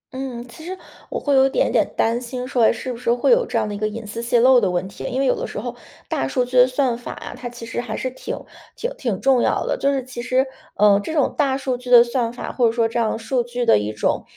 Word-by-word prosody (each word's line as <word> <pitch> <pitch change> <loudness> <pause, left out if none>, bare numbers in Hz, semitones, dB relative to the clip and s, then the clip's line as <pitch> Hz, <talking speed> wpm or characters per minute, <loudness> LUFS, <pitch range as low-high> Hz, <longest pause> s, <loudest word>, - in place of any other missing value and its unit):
嗯， 255 -2 -5
其 240 +7 -13
实 370 +3 -6 0.3
我 - - -3
会 285 - 0
有 270 0 +6
一 - - -2
点 - - +1
点 - - +2
担 230 +2 +1
心 250 +1 -5
说 250 -3 0
哎， - - +5
是 250 +3 -5
不 235 - -9
是 235 - 0
会 245 - +2
有 480 0 +4
这 - - -1
样 215 -1 0
的 205 - -4
一 200 - -5
个 215 - 0
隐 225 +1 -6
私 225 +3 -5
泄 235 0 +2
漏 255 0 +6
的 195 - +2
问 180 +1 -1
题。 195 - -10
因 255 - -2
为 275 - +2
有 - - +3
的 - - -4
时 - - -6
候 - - -5 0.3
大 - - -1
数 250 -3 0
据 250 +1 -7
的 250 0 +8
算 255 -1 0
法 240 - -7
啊， - - -8
它 245 - -6
其 240 -1 -9
实 230 +1 -3
还 220 -3 -5
是 255 - -3
挺 - - -6 0.4
挺 485 - -3
挺 235 - -2
重 265 -2 +3
要 - - +1
的。 - - 0
就 280 - +1
是 270 -2 -1
其 250 -1 -7
实， 255 +2 +1 0.3
呃， 205 -1 +5
这 315 - -5
种 290 -4 +2
大 275 -3 +1
数 265 -2 -2
据 250 0 -10
的 240 -1 +9
算 235 -1 -1
法， 245 - -6
或 245 -3 +2
者 - - +2
说 230 -1 +1
这 235 +1 -2
样 220 -1 0
数 240 +3 -1
据 245 +1 -3
的 225 - +5
一 105 +1 -3
种 105 - -1
245 Hz, 320 characters per minute, -21 LUFS, 230-265 Hz, 0.4 s, 的